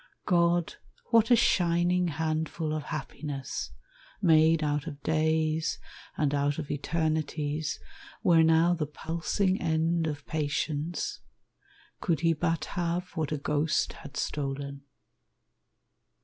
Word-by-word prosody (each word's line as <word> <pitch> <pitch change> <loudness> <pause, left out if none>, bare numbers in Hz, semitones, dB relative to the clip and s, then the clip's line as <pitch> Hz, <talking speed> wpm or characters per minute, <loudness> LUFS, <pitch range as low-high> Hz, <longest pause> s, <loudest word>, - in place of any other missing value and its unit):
God, 170 -2 +2 0.3
what 230 -1 +5
a 245 - +8
shining 175 -3 +3
handful 160 0 -2
of 155 -1 -3
happiness, 145 -3 -5 0.5
Made 160 -3 +5
out 150 +1 -1
of 145 -3 -7
days 160 0 +1 0.4
and 145 -2 +1
out 145 0 +1
of 150 -3 -4
eternities, 155 0 -1 0.4
Were 165 -2 +6
now 160 +2 +5
the 160 -4 -2
pulsing 170 +6 -1
end 165 0 +1
of 145 -2 -5
patience 150 +1 -2 0.8
Could 160 -4 0
he 165 -1 +4
but 165 +1 -1
have 175 0 -2
what 155 -2 -2
a 155 - 0
ghost 150 +2 0
had 140 - -10
stolen! 140 -1 -3
160 Hz, 115 wpm, -29 LUFS, 150-170 Hz, 0.8 s, a